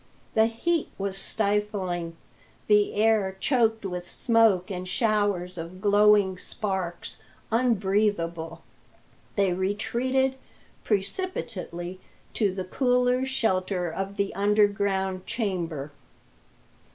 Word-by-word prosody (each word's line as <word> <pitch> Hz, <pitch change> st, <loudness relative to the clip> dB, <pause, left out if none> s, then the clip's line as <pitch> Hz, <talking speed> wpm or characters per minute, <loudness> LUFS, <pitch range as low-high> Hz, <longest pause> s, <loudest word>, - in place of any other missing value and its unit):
The 220 Hz, 0 st, +4 dB
heat 320 Hz, +9 st, -1 dB
was 195 Hz, -1 st, -2 dB
stifling; 195 Hz, -5 st, -1 dB, 0.5 s
the 210 Hz, -1 st, +3 dB
air, 210 Hz, -3 st, +2 dB
choked 225 Hz, -5 st, +2 dB
with 180 Hz, -1 st, -5 dB
smoke 220 Hz, -5 st, +3 dB
and 185 Hz, -1 st, -4 dB
showers 200 Hz, -4 st, 0 dB
of 170 Hz, +3 st, -7 dB
glowing 205 Hz, -2 st, +4 dB
sparks, 190 Hz, -, -4 dB, 0.3 s
unbreathable. 195 Hz, -8 st, 0 dB, 0.7 s
They 195 Hz, -3 st, +2 dB
retreated 245 Hz, +8 st, 0 dB, 0.5 s
precipitately 195 Hz, -, -3 dB, 0.3 s
to 205 Hz, -4 st, +1 dB
the 185 Hz, 0 st, -4 dB
cooler 250 Hz, +4 st, +2 dB
shelter 185 Hz, -8 st, 0 dB
of 195 Hz, +3 st, -4 dB
the 200 Hz, 0 st, -1 dB
underground 200 Hz, -2 st, +1 dB
chamber. 170 Hz, -, -3 dB
200 Hz, 90 wpm, -26 LUFS, 185-220 Hz, 0.7 s, The